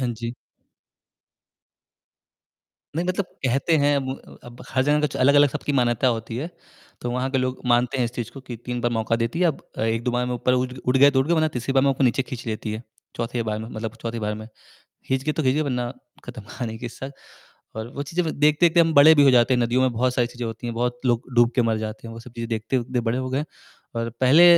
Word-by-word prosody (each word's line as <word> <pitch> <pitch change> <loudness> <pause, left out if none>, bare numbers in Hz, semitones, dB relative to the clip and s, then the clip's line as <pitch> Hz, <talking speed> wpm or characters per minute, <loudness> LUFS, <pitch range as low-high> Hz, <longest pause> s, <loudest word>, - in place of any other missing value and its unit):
हाँ 125 - 0
जी। 115 +1 -5 2.6
नहीं 170 +2 -1
मतलब 185 +2 0 0.2
कहते 135 +6 +2
हैं 145 0 +4
अब 135 -1 -5
अब 120 0 -12
हर 130 - +1
जगह 150 +1 +3
कुछ 150 -2 -1
अलग-अलग 145 +2 +5
सबकी 145 +1 -3
मान्यता 120 -2 +2
होती 115 +1 -6
है। 145 +7 -3 0.5
तो 120 - -3
वहाँ 125 +2 -1
के 135 - +1
लोग 130 0 -2
मानते 125 +2 +2
हैं 125 - +2
इस 115 - -2
चीज़ 120 -2 -4
को 135 - -9
कि 125 -2 -8
3 125 0 -3
बार 120 0 0
मौका 115 0 0
देती 115 +8 -2
है, 180 - +5
अब 155 -5 -1 0.2
अ, - - -1
1-2 115 +2 0
बार 125 0 0
में 125 - -2
ऊपर 125 +1 +1
उठ 125 0 0
उठ 125 +1 +3
गए 140 +2 +7
तो 135 -1 +2
उठ 135 - 0
गए 170 - +3
वरना 155 -1 +2
तीसरी 125 +3 -2
बार 135 - +5
में 140 - +4
नीचे 130 +1 +3
खींच 125 -2 -8
लेती 110 -1 -3
है। 110 +2 -5 0.3
चौथी 115 0 -2
बार 105 0 -1
में 110 +1 -6
मतलब 110 -1 -5
चौथी 115 0 -3
बार 105 -1 -2
में, 110 +1 -8 0.6
खींच 130 0 0
गए 155 - 0
तो 155 - -2
खींच 130 -1 +3
गए 155 - +2
वरना 125 -4 -2 0.3
खत्म 120 -2 -8
कहानी 110 +2 -6
का 120 - -7
हिस्सा। 135 +3 -7 0.6
और 110 +1 -4
वो 140 - -3
चीज़े 165 +5 -1
व 160 - -1
देखते-देखते 155 +4 +3
हम 165 -1 +4
बड़े 150 +2 +8
भी 145 - +6
हो 135 - +6
जाते 125 +1 +4
हैं 125 - +2
नदियों 120 +2 +2
में 130 -1 +2
बहुत 125 +2 +1
सारी 120 -1 +2
चीज़ें 120 0 -6
होती 115 +2 -6
है। 120 - -3
बहुत 120 +1 -1
लोग 120 -1 +2
डूब 120 0 +5
के 125 - +4
मर 115 -2 +1
जाते 110 +1 -6
हैं, 115 - -8
वो 115 - -9
सब 125 - -13
चीज़ें 115 -1 -5
देखते-देखते 115 +2 -1
हुए 120 - +3
बड़े 115 +2 +1
हो 130 0 -3
गए 130 - -1
हैं 150 - -3 0.5
और 115 0 -2
पहले 135 +7 +7
125 Hz, 255 wpm, -23 LUFS, 115-135 Hz, 2.6 s, बड़े